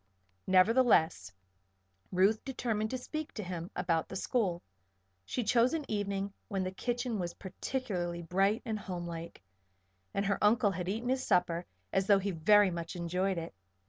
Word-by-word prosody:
Nevertheless 185 - +4 0.8
Ruth 195 +4 +3
determined 230 -5 -2
to 255 - -2
speak 310 +4 -6
to 215 - -4
him 175 -1 -5
about 170 -3 0
the - - -6
school. 190 -4 0 0.6
She 245 - -2
chose 240 +6 +3
an 310 -3 -3
evening 200 -1 -2
when 195 -3 -1
the 185 - -2
kitchen 240 +2 -2
was 175 -1 -3
particularly 185 -4 -3
bright 195 +6 +1
and 220 -2 -2
homelike 170 - -6 0.7
and 200 - -1
her 200 +1 0
uncle 210 0 +4
had 180 0 -3
eaten 225 +5 -2
his 260 0 +1
supper 175 -1 +1 0.3
as 190 0 +1
though 200 - +7
he 195 +1 -1
very 195 +4 +5
much 170 0 -5
enjoyed 180 +2 -1
it. 165 -7 -5
195 Hz, 155 wpm, -32 LUFS, 175-225 Hz, 0.8 s, though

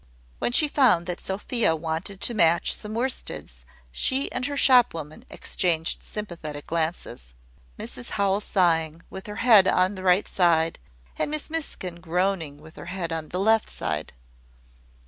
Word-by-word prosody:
When - - 0
she 300 +5 +4
found 250 - +3
that 180 0 -4
Sophia 195 -1 0
wanted 165 +5 -4
to 240 - 0
match 170 -5 +3
some 215 +1 -8
worsteds, 230 - -4 0.3
she 260 - 0
and 255 +1 -2
her 285 0 -4
shop 250 -8 +5
woman 155 -1 -8
exchanged 165 -3 0
sympathetic 165 -8 -7
glances 160 - -3 0.4
Mrs 125 - -6
Howell 200 0 +2
sighing, 165 -5 +1
with 190 - -8
her 210 - -6
head 215 -6 +7
on 185 +2 +3
the 190 - -8
right 185 +1 +3
side, 165 -3 +2 0.4
and - - 0
Miss 305 +1 -2
Miskin 185 - -4
groaning, 175 -4 -1
with 155 +2 -15
her - - -9
head 180 -2 -4
on 160 -1 -5
the 180 - -3
left 220 +2 +3
side. 80 0 -4
180 Hz, 155 wpm, -25 LUFS, 160-210 Hz, 0.4 s, head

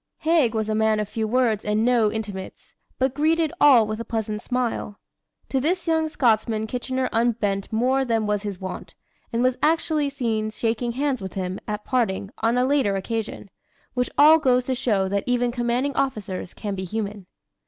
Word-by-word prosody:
Haig 310 -8 +3
was 220 -1 -1
a 215 - 0
man 220 0 +2
of 210 - -2
few 220 +1 -2
words 230 -3 +1
and 210 +1 +1
no 235 -4 +3
intimates, 205 -4 -7 0.2
but 260 0 +1
greeted 315 +2 +1
all 260 -6 +7
with 215 +1 -4
a - - -3
pleasant 215 -2 -3
smile. 240 -5 -2 0.5
To 270 - +1
this 345 +6 0
young 320 -1 +2
Scotsman 220 -5 +1
Kitchener 255 +2 -2
unbent 225 -4 0
more 255 +4 +2
than 225 -4 0
was 210 -1 0
his 200 -3 -5
wont, 190 -1 -7 0.4
and 235 +1 0
was 255 0 +1
actually 310 -2 +1
seen 230 -6 -1
shaking 230 +2 -2
hands 270 -2 -1
with 190 -1 -6
him, 185 -1 -3
at 210 0 -4
parting, 205 -5 0
on 230 +2 +1
a 250 - +3
later 265 -7 +2
occasion; 210 0 -4 0.4
which 250 -1 0
all 310 +2 +8
goes 255 -4 +2
to 260 - 0
show 210 -6 +1
that 200 +1 -1
even 245 -1 +1
commanding 245 +3 -1
officers 205 -10 -3
can 205 -2 -4
be 190 -1 -4
human. 205 0 -4
230 Hz, 185 wpm, -24 LUFS, 210-260 Hz, 0.5 s, all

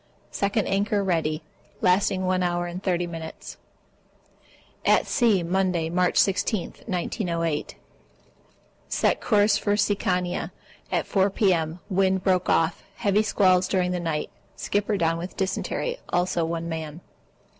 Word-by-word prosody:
(Second 200 +1 0
anchor 200 +1 +1
ready) 160 -4 0 0.4
Lasting 185 0 +2
one 185 0 +1
hour 175 -1 0
and 175 +1 -6
30 180 -2 0
minutes. 165 -2 -8 1.3
At - - +4
sea, 220 -8 +2
Monday, 175 -2 0
March 180 0 +1
16, 200 0 +1 0.2
1908. 170 -5 -2 1.1
Set - - +1
course 210 -1 +3
for 205 - 0
Sikiana 185 -4 0 0.4
at - - 0
4 195 0 +2
P.M. 175 -4 +1
Wind 190 -1 +1
broke 185 -2 +2
off. 165 0 +1
Heavy 205 -2 +2
squalls 185 -4 +3
during 180 -2 +1
the 180 - -1
night. 165 -3 -2 0.2
Skipper 205 0 -1
down 165 -1 +1
on 175 - -4
dysentery, 480 - -2
also 175 -1 +1
one 165 0 -3
man. 160 0 -5
180 Hz, 125 wpm, -25 LUFS, 170-195 Hz, 1.3 s, At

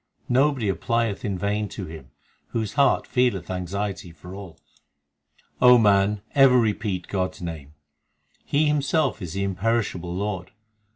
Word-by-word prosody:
Nobody 130 -2 +2
applieth 115 +2 -1
in 100 -3 -2
vain 105 +2 -1
to 95 - -6
Him 80 -5 -10 0.4
Whose 110 -3 -2
heart 140 -2 +3
feeleth 125 -8 0
anxiety 95 0 -4
for 85 +3 -12
all. 95 -5 -10 1.0
O 125 0 +8
man, 100 -1 +3
ever 135 -2 +6
repeat 105 -5 -1
God 95 -2 -2
s - - -14
name; 80 -4 -7 0.7
He 150 +2 +1
Himself 150 -4 +1
is 85 -3 -5
the 100 - -2
imperishable 95 -3 -1
Lord. 100 -1 -3
100 Hz, 135 wpm, -24 LUFS, 90-120 Hz, 1.0 s, O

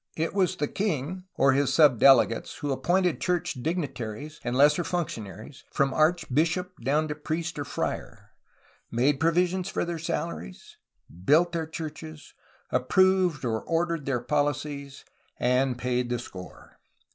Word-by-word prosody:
It 165 +1 -1
was 190 -2 +1
the 150 - -1
king 185 -1 -3
or 135 - +4
his 135 -1 +2
sub 135 -5 +5
delegates 135 -4 +4
who 145 -3 -3
appointed 175 +5 +1
church 180 -2 0
dignitaries 145 -3 -4
and 120 +1 -2
lesser 150 +5 +5
functionaries, 130 - -5
from 135 -2 +1
archbishop 165 +3 +1
down 150 +5 +1
to - - -1
priest 160 +2 -4
or 145 - -3
friar, - - -5 0.6
made 135 +4 +1
provision 180 +3 +2
for 180 - -2
their 170 -1 -4
salaries, 165 - -5 0.5
built 165 - +4
their 165 -1 -2
churches, 155 -1 -8 0.4
approved 180 +3 +2
or 110 -2 -1
ordered 165 -3 -1
their 125 -3 0
policies, 145 0 -2 0.3
and 125 +1 +1
paid 125 0 -1
the 120 - 0
score. 90 -7 -11
150 Hz, 135 wpm, -27 LUFS, 130-170 Hz, 0.6 s, sub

